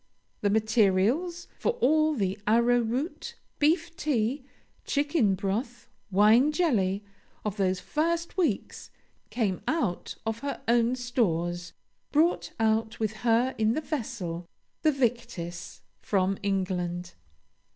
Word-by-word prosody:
The 205 - +2
materials 220 - +2
for 470 - +1
all 310 - +3
the 195 -5 0
arrowroot, 240 +5 +1 0.2
beef 330 +3 +2
tea, 265 -3 0 0.4
chicken 285 - +1
broth, 220 +6 -3 0.2
wine 215 +8 +5
jelly, 215 - +1 0.4
of 210 0 -2
those 185 -2 +1
first 335 - -1
weeks, 360 -3 -1 0.4
came 205 -7 -1
out 235 - -1
of 225 0 -2
her 280 +2 -5
own 235 +1 +3
stores, 175 -9 -1 0.4
brought 320 +4 +2
out 220 +1 +1
with 220 -1 0
her 240 +4 +2
in 220 0 +3
the 310 - 0
vessel, 220 - -4 0.3
the 310 - +4
Victis, 225 - -3 0.2
from 195 -1 0
England. 180 -3 -2
230 Hz, 110 wpm, -28 LUFS, 195-285 Hz, 0.4 s, wine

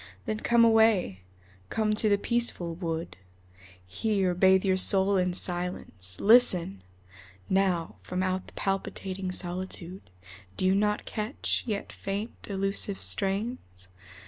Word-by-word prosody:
Then 215 -3 -2
come 235 0 +4
away, 220 - +3 0.5
come 215 -1 0
to 215 0 +1
the 205 - +4
peaceful 220 -6 -1
wood, 165 -1 -5 0.7
Here 190 - 0
bathe 190 +2 +4
your 190 -1 +3
soul 190 +1 +3
in 180 -1 +1
silence. 175 - -3
Listen! 190 - +4 0.7
Now, 185 -3 +1
From 185 +1 -3
out 185 0 -2
the - - -15
palpitating 195 -1 -3
solitude 180 - -4 0.5
Do - - 0
you 185 - +4
not 210 +1 0
catch, 215 +4 -2
yet 210 -3 -4
faint, 200 +3 -4 0.2
elusive 195 0 -1
strains? 195 - -2
190 Hz, 120 wpm, -28 LUFS, 180-210 Hz, 0.7 s, come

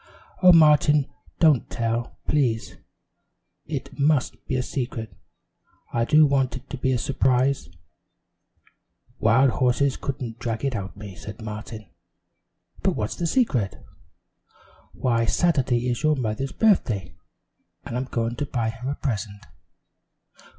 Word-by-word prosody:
"Oh, 185 -1 +8
Martin, 150 -3 +5 0.3
don't 155 -7 +3
tell, 115 +1 -2
please. 120 -7 0
Oh, - - -24 0.9
it - - -6
must 145 -2 +1
be 130 - -1
a 125 - 0
secret! 120 -4 -4 0.8
I 115 -1 +1
do 155 +3 +6
want 135 -3 +1
it - - -13
to 140 - -4
be 130 +1 0
a 130 - +2
surprise!" 130 0 +1 1.5
"Wild 120 +4 +4
horses 130 +3 +1
couldn't 125 -4 -5
drag 115 +1 -3
it 135 -3 -1
out 95 -3 -4
of - - -20
me," 100 -2 -8
said 105 +4 -9
Martin; 110 -1 -7 0.9
"but - - +1
what's 105 0 -2
the 170 - -1
secret?" 145 - +1 1.2
"Why, 115 -2 +1
Saturday 130 -4 +1
is 120 -1 -1
your 155 -1 +3
mother's 130 +1 -2
birthday, 120 - +1 0.7
and - - -5
I'm 125 +2 -1
going 115 -2 -2
to 145 - -2
buy 120 -4 -1
her 120 +4 -6
a 140 - -2
present." 105 -6 -4
125 Hz, 135 wpm, -24 LUFS, 115-140 Hz, 1.5 s, Oh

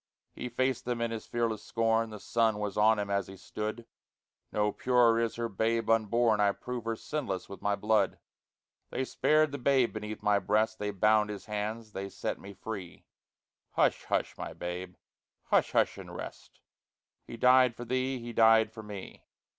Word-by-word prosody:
He 125 - -5
faced 130 0 0
them 120 -1 -1
in 115 0 -1
his 115 -1 -5
fearless 115 -3 -1
scorn 115 0 +1
(The 105 -1 -8
sun 115 -1 +1
was 105 -1 -3
on 110 +1 +5
him 100 -1 -2
as 100 -2 0
he 95 - -10
stood): 110 +4 -5 0.7
"No 105 0 +1
purer 120 -2 +3
is 115 -1 0
her 115 0 -2
babe 115 +2 0
unborn; 115 0 +3
I 100 -1 +4
prove 125 0 -6
her 115 0 -1
sinless 110 -8 -4
with 100 - -10
my 100 0 +1
blood." 110 +1 +1 0.7
They 130 - -2
spared 155 +2 +2
the 140 - -5
babe 130 -1 +3
beneath 110 -1 -6
my 105 -1 +4
breast, 110 +3 +1
They 105 - -2
bound 105 +2 +3
his 105 -1 -6
hands, 110 +1 -4
they 100 0 -5
set - - -4
me 100 0 -10
free, 100 -6 -7 0.7
Hush, - - +2
hush, - - -1
my - - -5
babe! 90 +1 -5 0.6
hush, - - +3
hush - - +2
and - - -9
rest; - - -9 0.7
He 115 - -8
died 125 0 +5
for 120 - -7
thee! 130 +2 -1
he 120 -1 -7
died 110 -1 +5
for 110 0 -9
me! 105 -3 -9
110 Hz, 180 wpm, -30 LUFS, 105-120 Hz, 0.7 s, on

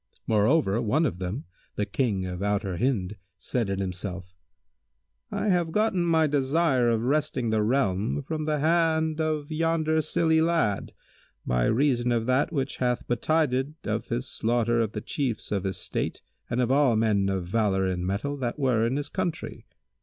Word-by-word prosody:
Moreover, 110 0 +2
one 140 +9 +2
of 90 - -2
them, 95 +9 -4 0.3
the 105 - 0
King 105 -3 -1
of 90 0 -5
Outer 100 -3 -1
Hind, 105 -5 -1 0.2
said 110 +3 -2
in 95 - -1
himself, 90 -1 -5 1.0
"I 210 - -1
have 175 -3 +1
gotten 210 -2 +1
my 160 -2 +3
desire 140 -2 +2
of 115 -1 +1
wresting 140 -3 0
the 110 -1 +2
realm 110 +1 0
from 155 +2 -3
the 155 -1 0
hand 160 0 +2
of 155 -1 -2
yonder 160 0 +1
silly 160 +1 +2
lad, 160 -12 0 0.5
by - - +1
reason 125 -1 +2
of 115 -1 +1
that 130 +5 +2
which 140 -4 -2
hath 125 -1 -1
betided 140 +2 +1
of - - -2
his - - -2
slaughter 120 0 +1
of 110 -1 -2
the 105 - -4
Chiefs 125 -1 -3
of 100 -2 -1
his 95 -1 -2
State - - -3 0.3
and 120 - -1
of 125 0 +1
all 135 -4 +4
men 105 -3 +2
of 95 -2 -2
valour 95 -1 +1
and 90 -1 -1
mettle 100 +10 -2
that 125 -1 -3
were 125 -5 +2
in 125 - -1
his 145 0 -2
country. 185 -4 -4
125 Hz, 170 wpm, -26 LUFS, 105-155 Hz, 1.0 s, all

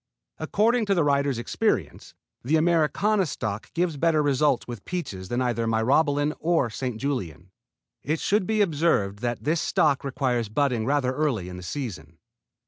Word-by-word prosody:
According 225 +1 +1
to 200 - +2
the 170 - +3
writer's 140 -2 +1
experience 120 - -2 0.3
the 140 +6 +1
Americana 175 +5 +2
stock 105 -6 -4
gives 170 -3 0
better 155 0 +2
results 145 -1 +1
with 120 -5 -7
peaches 100 - -5
than 120 +1 0
either 115 -2 -1
Myrobalan 145 +6 +2
or 160 -8 +1
St. 125 0 -4
Julien. 95 - -4 0.5
It 155 +2 -1
should 200 -2 +1
be 215 -1 +1
observed 150 - +1
that 120 +1 -3
this 160 +2 +1
stock 145 -5 +2
requires 125 -5 -1
budding 120 -1 0
rather 135 -2 +1
early 130 -11 -1
in 90 - -8
the - - -8
season. 90 - -6
140 Hz, 155 wpm, -25 LUFS, 115-160 Hz, 0.5 s, the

